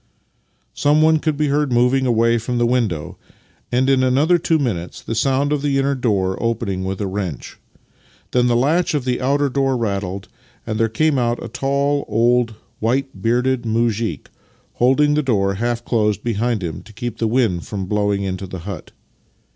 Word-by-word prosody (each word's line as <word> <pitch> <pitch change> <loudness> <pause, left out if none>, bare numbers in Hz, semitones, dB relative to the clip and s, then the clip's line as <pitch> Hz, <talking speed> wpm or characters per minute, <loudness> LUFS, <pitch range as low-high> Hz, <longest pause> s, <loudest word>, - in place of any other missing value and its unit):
Someone 155 +2 +3
could 155 -2 -1
be 150 -1 +1
heard 145 -1 +1
moving 125 +2 +3
away 115 0 +3
from 120 +2 -3
the 120 - +2
window, 115 -11 -1 0.5
and 125 +2 +2
in 135 -1 +3
another 140 +7 +3
two 165 0 +2
minutes 100 - -3
the - - -4
sound 135 +5 +1
of 145 - -1
the 140 -1 0
inner 135 +1 +1
door 100 -8 0
opening 110 -5 -1
with 95 0 -3
a - - 0
wrench. 95 -7 -5 0.7
Then 125 0 +3
the 120 - +2
latch 155 +7 +2
of 140 -4 -1
the 125 0 -1
outer 140 +2 +2
door 135 -1 0
rattled, 100 -4 -3 0.4
and 110 -1 -3
there 115 0 +2
came 145 +4 +1
out 120 -1 -1
a - - -5
tall 140 +4 0
old 115 +1 +2 0.2
white 125 -2 -1
bearded 125 +3 +1
muzhik, 115 - -1 0.4
holding 140 +4 +3
the 150 - +2
door 100 -8 +1
half 120 +3 -2
closed 105 -3 0
behind 115 -2 -1
him 80 -3 -4
to 110 - -16
keep 120 +1 -5
the 115 - +1
wind 110 -7 0
from 100 -3 -4
blowing 100 0 0
into 95 0 -4
the 95 -1 -7
hut. 100 -6 -7
120 Hz, 180 wpm, -20 LUFS, 105-135 Hz, 0.7 s, Someone